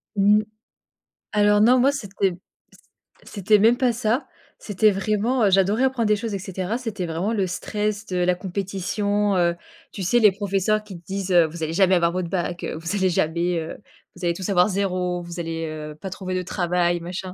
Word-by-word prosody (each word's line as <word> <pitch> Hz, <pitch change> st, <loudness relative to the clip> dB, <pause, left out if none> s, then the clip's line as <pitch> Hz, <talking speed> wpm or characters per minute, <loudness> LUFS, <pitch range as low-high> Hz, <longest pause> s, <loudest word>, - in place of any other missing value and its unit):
Mmh. 205 Hz, +1 st, +4 dB, 0.9 s
Alors 205 Hz, 0 st, +4 dB
non, 250 Hz, +4 st, +5 dB
moi, 270 Hz, +3 st, +4 dB
c'était 200 Hz, -7 st, -1 dB, 0.4 s
c -, -, -20 dB, 0.4 s
c'était 205 Hz, +1 st, +2 dB
même 230 Hz, +3 st, +4 dB
pas 250 Hz, -2 st, +2 dB
ça. 230 Hz, +4 st, -1 dB, 0.3 s
C'était 210 Hz, +1 st, +2 dB
vraiment, 215 Hz, +5 st, 0 dB
heu, -, -, +4 dB
j'adorais 195 Hz, +5 st, +3 dB
apprendre 260 Hz, -4 st, +1 dB
des 210 Hz, -, +4 dB
choses 220 Hz, 0 st, -4 dB
et -, -, -3 dB
cetera. 190 Hz, +4 st, -3 dB
C'était 215 Hz, -7 st, -4 dB
vraiment 170 Hz, +7 st, -2 dB
le 195 Hz, -4 st, 0 dB
stress 210 Hz, +3 st, -3 dB
de 180 Hz, -, -3 dB
la 180 Hz, 0 st, +2 dB
compétition, 200 Hz, +2 st, -1 dB
heu, 170 Hz, -1 st, +2 dB, 0.4 s
tu 195 Hz, -, -6 dB
sais, 240 Hz, +7 st, +3 dB
les 210 Hz, -3 st, +6 dB
professeurs 200 Hz, +1 st, 0 dB
qui 195 Hz, -5 st, -10 dB
te -, -, -25 dB
disent: 195 Hz, -1 st, -4 dB
«Heu 170 Hz, -2 st, +6 dB
vous 160 Hz, +1 st, -7 dB
allez 160 Hz, +1 st, -2 dB
jamais 190 Hz, +1 st, +4 dB
avoir 170 Hz, -1 st, +2 dB
votre 180 Hz, -1 st, -3 dB
bac. 175 Hz, -1 st, -3 dB
Heu, -, -, -3 dB
vous 165 Hz, +5 st, -4 dB
allez 190 Hz, -2 st, +2 dB
jamais, 170 Hz, +1 st, 0 dB
heu 160 Hz, -, -6 dB, 0.4 s
vous 180 Hz, 0 st, -6 dB
allez 170 Hz, -, +2 dB
tous 190 Hz, +2 st, -5 dB
avoir 180 Hz, +1 st, +4 dB
0. 180 Hz, -2 st, -1 dB
Vous 175 Hz, 0 st, -8 dB
allez, 165 Hz, -1 st, -3 dB
heu, 155 Hz, -1 st, -7 dB
pas 190 Hz, +5 st, -7 dB
trouver 185 Hz, 0 st, -5 dB
de 185 Hz, -, -1 dB
travail», 175 Hz, -1 st, 0 dB
machin. 180 Hz, +2 st, -6 dB
190 Hz, 205 wpm, -23 LUFS, 175-210 Hz, 0.9 s, les